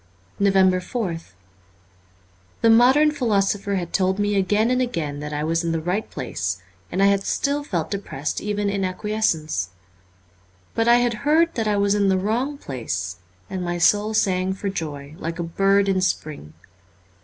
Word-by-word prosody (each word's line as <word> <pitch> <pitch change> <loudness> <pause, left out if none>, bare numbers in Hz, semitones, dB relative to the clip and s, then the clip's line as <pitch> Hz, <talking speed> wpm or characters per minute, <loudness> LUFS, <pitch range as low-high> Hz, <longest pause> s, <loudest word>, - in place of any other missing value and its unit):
343 190 +2 +2
NOVEMBER 175 -7 -2
4th 95 - -24 1.3
'HE 230 - +6
modern 260 +7 +6
philosopher 205 -6 0
had 175 -3 -4
told 190 0 +1
me 205 0 0
again 205 +4 +2
and 255 - +2
T" - - +3
again 155 - -3
that 150 0 -5
I 150 0 -2
was 165 +2 0
in 165 -1 -1
the 165 - 0
right 180 +7 -2
place, 90 - -3 0.3
and 190 +2 +1
I - - +6
had 200 0 +3
still 285 +7 -1
felt 175 - -3
depressed 195 -8 -3
even 205 0 -1
in 200 -1 -1
acquiescence. 185 - -1 1.0
But 225 0 0
I 235 - +7
had 245 -1 +2
heard 320 +3 +3
that 225 -2 -1
I 210 -1 +1
was 200 0 +2
in 200 -1 +2
the 190 - +3
wrong 240 +9 -1
place, 115 - -4 0.3
and 190 - -4
my 175 0 -2
soul 210 +5 +3
sang 185 -2 +1
for 195 +1 -4
joy, 150 -6 -5
like 165 +1 -4
a 170 - -2
bird 195 +4 +2
in 190 -1 +1
spring. 150 - -3
195 Hz, 180 wpm, -23 LUFS, 165-215 Hz, 1.3 s, I